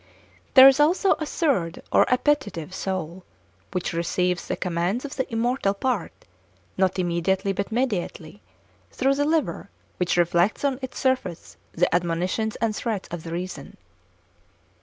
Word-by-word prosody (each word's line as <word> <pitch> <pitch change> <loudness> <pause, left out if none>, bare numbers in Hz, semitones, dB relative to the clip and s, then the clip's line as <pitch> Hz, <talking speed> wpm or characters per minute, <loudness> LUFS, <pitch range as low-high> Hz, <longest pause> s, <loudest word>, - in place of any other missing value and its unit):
There 265 0 +11
is 270 +1 +5
also 355 +6 +3
a 310 - -3
third 220 - -1
or - - +4
appetitive 250 - 0
soul, 185 -2 -4 0.5
which 180 -1 -2
receives 180 +1 -1
the - - -1
commands 180 +8 -1
of 275 - -7
the 260 - -3
immortal 230 -3 0
part, 235 -3 -1 0.6
not 190 0 +1
immediately 185 +2 0
but 200 +2 -3
mediately, 205 -7 -3 0.5
through 270 +1 +1
the 290 +1 0
liver, 315 0 -1 0.3
which 180 -1 0
reflects 175 +8 +2
on 270 -2 0
its 260 -1 -6
surface 255 -10 -1 0.2
the 175 0 +1
admonitions 180 +5 0
and 220 -1 -1
threats 215 -5 -3
of 175 -1 -5
the 165 - -8
reason. 180 +2 -6
195 Hz, 140 wpm, -24 LUFS, 175-260 Hz, 0.6 s, There